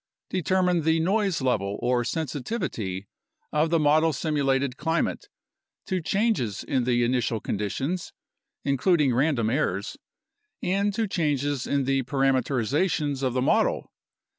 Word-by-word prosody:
Determine 180 -1 +1
the 160 +1 +2
noise 190 -2 +1
level 100 -6 0
or 120 0 +1
sensitivity 125 - -3 0.4
of 155 +2 +2
the 165 - +3
model 155 +1 +4
simulated 140 -3 0
climate 160 +4 -1 0.6
to 185 -1 -1
changes 195 - 0
in 130 -3 0
the 120 -1 +2
initial 120 -2 0
conditions 135 - -3 0.5
(including 140 0 +3
random 125 -4 +1
errors) 140 +5 -1 0.7
and 200 +3 +1
to 225 -1 0
changes 145 -6 -1
in 140 -1 +1
the 135 0 +1
parameterizations 135 - 0
of 130 -3 0
the 125 0 0
model. - - +1
140 Hz, 120 wpm, -26 LUFS, 125-165 Hz, 0.7 s, model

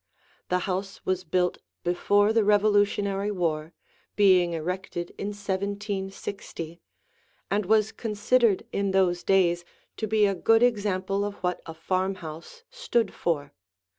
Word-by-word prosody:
The 180 - +2
house 195 +1 -4
was 185 0 0
built 180 +1 0 0.2
before 205 +4 +2
the 225 -1 +3
Revolutionary 205 -1 +2
War, 165 -5 -1 0.4
being 185 -4 +4
erected 175 +1 -4
in 200 - -4
1760, 200 -4 -4 0.7
and 205 0 +1
was 215 0 +3
considered 220 0 +1
in 200 -1 -1
those 180 -2 +2
days 175 -3 +3 0.3
to 220 - -2
be 215 0 +3
a 200 - +2
good 225 +5 +3
example 200 -4 +1
of 205 0 -3
what 180 0 -1
a 160 - -7
farmhouse 185 - -4
stood 240 - 0
for. 145 - -2
195 Hz, 125 wpm, -26 LUFS, 180-205 Hz, 0.7 s, being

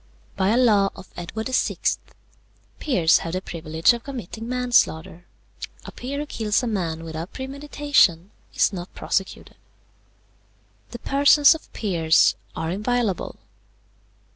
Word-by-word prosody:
"By 190 0 +1
a 225 - +3
law 210 -6 +4
of 190 - -12
Edward 200 +6 -5
the 260 - -5
Sixth, - - 0 0.8
peers 180 - +3
have 165 - -5
the 185 - 0
privilege 160 +2 +1
of 235 0 -6
committing 235 -4 -7
manslaughter. 240 -9 0 0.6
A - - -8
peer 270 +3 -6
who 295 - -3
kills 220 -4 -1
a - - 0
man 170 -8 -2
without 165 +2 -7
premeditation 265 - +1 0.2
is - - +2
not 180 -1 -7
prosecuted. 190 0 -3 1.3
"The 235 - -7
persons 285 +4 +5
of 320 - -11
peers 165 -7 +3 0.2
are 160 0 -3
inviolable. 215 0 -1
210 Hz, 130 wpm, -23 LUFS, 170-255 Hz, 1.3 s, persons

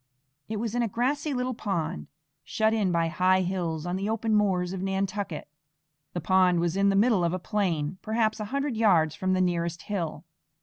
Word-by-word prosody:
It 220 - -2
was 225 0 -3
in 245 - +1
a 235 - +1
grassy 275 +8 -1
little 255 -1 -1
pond, 170 - -3 0.4
shut 220 0 +1
in 205 -5 +1
by 170 -1 +2
high 185 +3 +3
hills, 175 -4 -2
on 175 +1 -2
the 200 +2 -2
open 225 0 0
moors 190 -4 +2
of 190 - -4
Nantucket. 195 -3 -2 0.7
The 175 - -2
pond 185 0 +3
was 170 0 0
in 200 +1 +3
the 195 - +2
middle 205 -2 +3
of 170 0 +1
a - - 0
plain, 180 -4 -1
perhaps 220 0 0
a 215 - -3
hundred 275 +3 -2
yards 180 -9 +3
from 185 +3 -1
the 185 - +2
nearest 170 -2 -1
hill. 180 -6 -4
190 Hz, 200 wpm, -27 LUFS, 175-220 Hz, 0.7 s, high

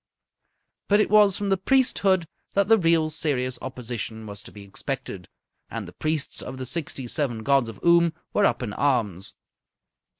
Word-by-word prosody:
But 205 +1 +4
it 210 - +2
was 210 -3 +6
from 205 -1 -2
the 195 - +3
priesthood 195 -6 +2 0.3
that 200 -1 +3
the 225 0 +5
real, 165 -2 +3
serious 130 -5 -1
opposition 120 -3 -5
was 100 -1 -7
to - - -12
be 100 - -11
expected. 100 - -6 0.4
And - - -5
the - - -11
priests 155 -1 -2
of 130 - -7
the 130 - -5
sixty 140 -3 -4
seven 120 -4 -2
gods 135 -2 +3
of 115 - -10
Oom 170 -1 +5 0.2
were 205 - +3
up 130 - +1
in 105 -4 -4
arms. 110 -10 0
145 Hz, 170 wpm, -25 LUFS, 120-185 Hz, 0.4 s, was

